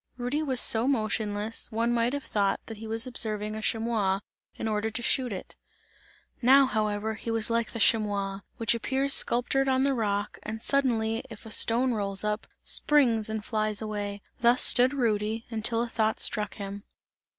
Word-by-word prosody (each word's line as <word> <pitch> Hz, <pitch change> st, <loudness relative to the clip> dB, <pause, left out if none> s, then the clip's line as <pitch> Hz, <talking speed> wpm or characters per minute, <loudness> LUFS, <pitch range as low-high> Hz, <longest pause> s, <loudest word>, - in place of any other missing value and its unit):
Rudy 250 Hz, +5 st, -2 dB
was 265 Hz, -5 st, 0 dB
so 230 Hz, +1 st, +5 dB
motionless, 215 Hz, -3 st, -1 dB
one 230 Hz, +2 st, 0 dB
might 235 Hz, +2 st, 0 dB
have 285 Hz, -1 st, -3 dB
thought 200 Hz, -2 st, 0 dB
that 225 Hz, -, -9 dB
he 220 Hz, +1 st, -9 dB
was 225 Hz, +1 st, +1 dB
observing 215 Hz, -4 st, -1 dB
a 220 Hz, -, -5 dB
chamois, 215 Hz, -4 st, 0 dB, 0.3 s
in -, -, -4 dB
order 215 Hz, 0 st, -1 dB
to 225 Hz, +2 st, -3 dB
shoot 255 Hz, 0 st, 0 dB
it. 190 Hz, -, -8 dB, 0.9 s
Now, 270 Hz, +3 st, +6 dB
however, 215 Hz, -2 st, -2 dB
he 225 Hz, -, -7 dB
was 225 Hz, 0 st, +1 dB
like 230 Hz, -1 st, 0 dB
the 230 Hz, -, -7 dB
chamois 200 Hz, -3 st, +1 dB, 0.2 s
which 230 Hz, 0 st, +1 dB
appears 265 Hz, +4 st, 0 dB
sculptured 260 Hz, +3 st, +3 dB
on 260 Hz, 0 st, +2 dB
the 275 Hz, 0 st, +2 dB
rock, 205 Hz, -3 st, -2 dB
and 220 Hz, +1 st, -7 dB
suddenly 230 Hz, -5 st, +1 dB
if 225 Hz, -1 st, -11 dB
a 220 Hz, -, -9 dB
stone 240 Hz, +3 st, +3 dB
rolls, 200 Hz, -2 st, -2 dB, 0.4 s
springs 235 Hz, -8 st, +3 dB
and 220 Hz, -1 st, -4 dB
flies 215 Hz, -2 st, -1 dB
away 205 Hz, -2 st, -5 dB, 0.2 s
thus 240 Hz, +1 st, +3 dB
stood 250 Hz, +1 st, +6 dB
Rudy, 220 Hz, -2 st, -1 dB
until 230 Hz, +1 st, -1 dB
a -, -, -4 dB
thought 220 Hz, -1 st, -1 dB
struck 210 Hz, -3 st, -1 dB
him. 200 Hz, -1 st, -7 dB
225 Hz, 175 wpm, -27 LUFS, 210-240 Hz, 0.9 s, Now